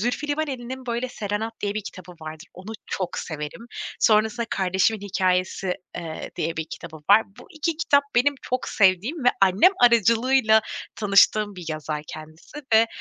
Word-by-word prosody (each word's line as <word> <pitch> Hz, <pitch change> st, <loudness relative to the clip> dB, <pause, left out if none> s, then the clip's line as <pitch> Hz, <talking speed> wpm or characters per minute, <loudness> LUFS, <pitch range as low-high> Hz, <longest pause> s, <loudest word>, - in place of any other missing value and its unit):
Zülfü 245 Hz, +7 st, -2 dB
Livaneli'nin 260 Hz, -4 st, -4 dB
böyle 240 Hz, +1 st, -2 dB
Serenat 215 Hz, -1 st, -4 dB
diye 205 Hz, 0 st, -2 dB
bir 215 Hz, -, -3 dB
kitabı 185 Hz, -2 st, -10 dB
vardır. 155 Hz, 0 st, -8 dB
Onu 190 Hz, +4 st, -9 dB
çok 185 Hz, -2 st, -3 dB
severim. 155 Hz, +8 st, -6 dB, 0.3 s
Sonrasında 220 Hz, +2 st, +3 dB
kardeşimin 190 Hz, +3 st, +1 dB
hikâyesi, 185 Hz, -1 st, 0 dB, 0.2 s
eee, 165 Hz, -2 st, -6 dB
diye 165 Hz, +1 st, -2 dB
bir 160 Hz, -, -2 dB
kitabı 160 Hz, -2 st, -8 dB
var. 215 Hz, +2 st, +8 dB, 0.2 s
Bu -, -, -13 dB
2 320 Hz, -1 st, -2 dB
kitap 285 Hz, -3 st, +3 dB
benim 255 Hz, +4 st, +3 dB
çok 255 Hz, 0 st, -3 dB
sevdiğim 210 Hz, -, +2 dB
ve -, -, +7 dB
annem 195 Hz, -, +5 dB
aracılığıyla 230 Hz, 0 st, +4 dB, 0.4 s
tanıştığım 205 Hz, 0 st, +3 dB
bir 180 Hz, -, -8 dB
yazar 155 Hz, -1 st, -4 dB
kendisi 155 Hz, -, -10 dB
ve 225 Hz, +1 st, +6 dB
210 Hz, 150 wpm, -24 LUFS, 180-245 Hz, 0.4 s, var